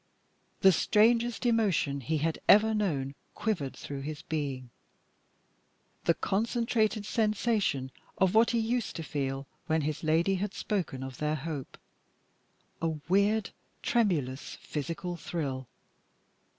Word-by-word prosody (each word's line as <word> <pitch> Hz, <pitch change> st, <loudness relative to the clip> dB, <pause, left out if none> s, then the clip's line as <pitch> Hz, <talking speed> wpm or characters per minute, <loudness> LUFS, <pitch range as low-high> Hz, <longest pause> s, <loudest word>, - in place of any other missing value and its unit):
The 190 Hz, -, +8 dB
strangest 230 Hz, +6 st, +3 dB
emotion 205 Hz, -12 st, +2 dB
he 155 Hz, +6 st, 0 dB
had 160 Hz, +2 st, -1 dB
ever 220 Hz, +2 st, +7 dB
known 150 Hz, -11 st, 0 dB, 0.2 s
quivered 170 Hz, -12 st, -1 dB
through 140 Hz, -1 st, -6 dB
his 150 Hz, +1 st, -6 dB
being 135 Hz, -5 st, -3 dB, 1.3 s
the 170 Hz, -, +4 dB
concentrated 220 Hz, 0 st, 0 dB
sensation 210 Hz, -, +1 dB, 0.3 s
of 190 Hz, -1 st, +3 dB
what 225 Hz, +1 st, +5 dB
he 235 Hz, -, +1 dB
used 230 Hz, 0 st, -1 dB
to 165 Hz, -, -4 dB
feel 135 Hz, -1 st, -3 dB, 0.2 s
when 160 Hz, -1 st, +2 dB
his 150 Hz, +1 st, -3 dB
lady 165 Hz, +5 st, +3 dB
had 205 Hz, -1 st, -3 dB
spoken 175 Hz, -11 st, -2 dB
of 130 Hz, -2 st, -7 dB
their 150 Hz, 0 st, 0 dB
hope 150 Hz, -2 st, -5 dB, 1.0 s
a 165 Hz, -, +1 dB, 0.2 s
weird, 200 Hz, +3 st, +2 dB, 0.3 s
tremulous, 155 Hz, -, 0 dB
physical 165 Hz, +4 st, -4 dB
thrill. 140 Hz, -5 st, -3 dB
170 Hz, 120 wpm, -30 LUFS, 140-215 Hz, 1.3 s, The